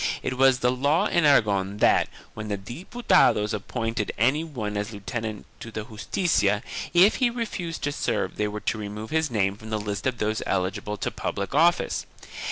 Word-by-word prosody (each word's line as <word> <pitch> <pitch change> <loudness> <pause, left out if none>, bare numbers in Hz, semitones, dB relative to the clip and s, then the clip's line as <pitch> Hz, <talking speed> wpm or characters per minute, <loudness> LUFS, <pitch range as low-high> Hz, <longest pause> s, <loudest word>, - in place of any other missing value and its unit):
It 130 - -2
was 130 -1 +4
the 125 - +3
law 140 +6 +2
in 170 -2 +2
Aragon 100 -8 +3
that, - - +4 0.2
when 110 0 -6
the 100 -1 -2
Diputados 140 - +2
appointed 115 +1 -2
any 130 +8 +2
one 115 -10 -4
as 105 +2 -2
lieutenant 110 0 -5
to 115 - -8
the 110 -1 -5
Justicia, 105 - 0 0.3
if 180 +5 +5
he 250 -2 +3
refused 215 -8 -4
to 145 - 0
serve - - -2
they 105 - +1
were 105 0 -5
to 110 - -1
remove 105 +1 -6
his 160 0 +1
name 100 -4 +1
from 110 0 -10
the 110 -1 -1
lists 105 +3 -3
of 125 -2 -1
those 110 0 -1
eligible 95 +3 -1
to - - -2
public 100 +4 -4
office. 170 +4 +2
110 Hz, 180 wpm, -25 LUFS, 105-145 Hz, 0.3 s, if